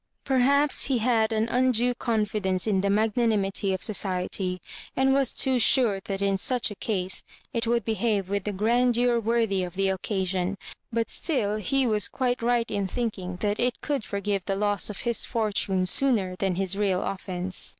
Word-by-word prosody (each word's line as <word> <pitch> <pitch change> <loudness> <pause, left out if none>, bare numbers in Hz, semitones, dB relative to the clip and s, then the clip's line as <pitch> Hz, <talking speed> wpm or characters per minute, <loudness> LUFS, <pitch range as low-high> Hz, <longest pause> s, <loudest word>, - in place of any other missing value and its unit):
Perhaps 280 +2 +2
he 265 -3 +1
had 225 -1 +2
an 220 0 0
undue 250 0 +2
confidence 210 -6 -1
in 200 -4 +1
the 200 - 0
magnanimity 210 -2 +1
of 190 - -3
society, 185 -2 -1 0.4
and 265 +1 +3
was 270 -2 +1
too 260 -1 +2
sure 230 -4 +3
that 195 0 -3
in 195 -1 +1
such 245 +1 +2
a - - -7
case 190 -4 0 0.3
it 230 -1 -1
would 235 0 +1
be> 225 - 0
have 210 -4 0
with 200 +1 -3
a - - 0
grandeur 240 +3 +2
worthy 225 -3 0
of 180 0 -5
the 195 0 +1
occasion; 190 -1 -1 0.4
but 230 -1 -1
still 215 -10 -1
he 265 +6 0
was 215 -4 +2
quite 250 -2 -1
right 235 0 +1
in 200 -1 -1
thinking 190 -4 -4
that 205 0 -1
it 245 0 0
could 285 -6 -2
forgive 200 -1 -2
the 195 - -1
loss 205 0 0
of 205 - -5
his 235 -3 +1
fortune 205 -5 0
sooner 200 -4 +2
than 190 -1 -1
his 190 0 0
real 195 -2 0
offence. 185 -1 -2
210 Hz, 180 wpm, -26 LUFS, 195-240 Hz, 0.4 s, and